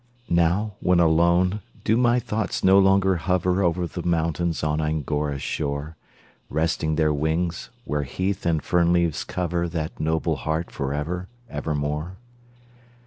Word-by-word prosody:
Now, 85 +5 +2
when 90 -1 +3
alone, 85 +4 +3 0.2
do 110 - +2
my 120 0 +3
thoughts 110 -2 -3
no 95 +1 +6
longer 95 -1 +4
hover 90 +2 +1
Over 90 -1 +1
the 85 +1 -5
mountains 85 0 0
on 75 0 0
Angora's 75 -2 -1
shore, 75 +1 -3 0.5
Resting 80 0 0
their 75 -1 +2
wings, 80 +3 -1 0.2
where 75 +1 -1
heath 95 +7 -2
and 80 -4 +1
fern 85 0 +2
leaves 85 -3 +1
cover 85 -1 -2
That 80 -2 -4
noble 80 0 0
heart 80 +5 -2
for 70 0 -3
ever, 85 +6 -3 0.2
ever 75 +1 -2
more? 75 +5 -3
85 Hz, 140 wpm, -24 LUFS, 75-90 Hz, 0.5 s, no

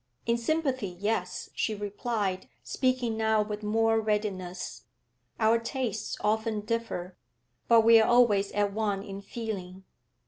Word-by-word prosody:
'In 235 - +2
sympathy, 260 -2 0
yes,' 185 +1 -3
she 215 - -1
replied, 205 -2 -3
speaking 255 -3 0
now 220 -1 +2
with 210 0 -5
more 225 +1 +2
readiness. 185 - -3 0.5
'Our 225 +1 +4
tastes 230 -2 -3
often 220 0 0
differ, 210 -5 -3 0.5
but 230 -1 +7
we 225 0 +7
are 220 - +2
always 220 -5 +4
at 205 -1 +1
one 205 -2 -1
in 200 -1 -7
feeling. 195 -4 -6
215 Hz, 130 wpm, -28 LUFS, 200-230 Hz, 0.5 s, but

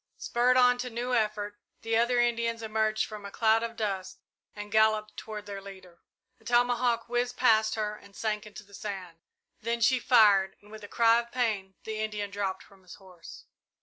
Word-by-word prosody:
Spurred 250 +2 +2
on 250 -1 +5
to 250 0 -3
new 245 +2 -3
effort, 210 -2 -1 0.2
the 225 0 0
other 240 +2 +2
Indians 230 -1 0
emerged 220 0 0
from 215 -1 -9
a 200 - -7
cloud 220 +2 +2
of 230 0 -4
dust 195 -4 -4 0.4
and 210 0 -8
galloped 215 0 +2
toward 215 -1 -7
their 200 -1 -7
leader. 190 -3 -13 0.4
A - - -24
tomahawk 240 0 +1
whizzed 245 +1 -1
past 220 -3 +3
her 210 -1 -2
and 200 -1 -18
sank 215 -1 -3
into 210 0 -11
the 200 0 -22
sand. 185 -5 -7 0.4
Then 235 +1 -2
she 245 +3 +3
fired, 205 -6 +4
and 205 +1 -19
with 215 -1 -10
a - - -7
cry 230 +2 +4
of 235 0 -7
pain, 210 -6 -1
the 220 0 -5
Indian 210 -2 -3
dropped 195 -2 -3
from 195 -1 -21
his 180 -1 -13
horse. 185 -3 -14
220 Hz, 190 wpm, -28 LUFS, 205-235 Hz, 0.4 s, on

